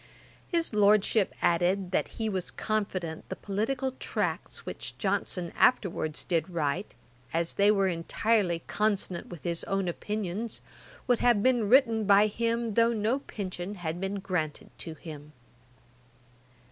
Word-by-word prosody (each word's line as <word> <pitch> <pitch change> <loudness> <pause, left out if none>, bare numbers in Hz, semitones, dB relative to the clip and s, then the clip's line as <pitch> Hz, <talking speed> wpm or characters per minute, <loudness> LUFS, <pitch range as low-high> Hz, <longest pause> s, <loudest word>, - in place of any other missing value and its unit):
His 335 -7 0
Lordship 210 0 +4
added, 180 +2 +2
that - - +1
he 225 - -1
was 190 -4 -1
confident 190 -7 -3
the - - -3
political 250 +7 -1
tracts - - -2
which - - -5
Johnson 175 -2 -1
afterwards 175 -9 +2
did 165 -1 0
write, 170 +2 -2 0.4
as 165 0 0
they 200 +1 +4
were 195 -2 +4
entirely 175 +1 +1
consonant 200 -4 -1
with 175 -4 -10
his 170 -1 -2
own 195 -1 0
opinions, 210 +4 -3 0.5
would 245 -2 +3
have 235 -4 +4
been 245 -5 +3
written 230 -4 +5
by 200 +1 +6
him 230 +1 -1
though 230 +2 +4
no 225 +5 +1
pension 195 -5 -5
had 175 -1 -4
been 195 +1 -2
granted 180 -6 -3
to 165 -2 -5
him. 150 -2 -10
200 Hz, 135 wpm, -29 LUFS, 175-220 Hz, 0.5 s, by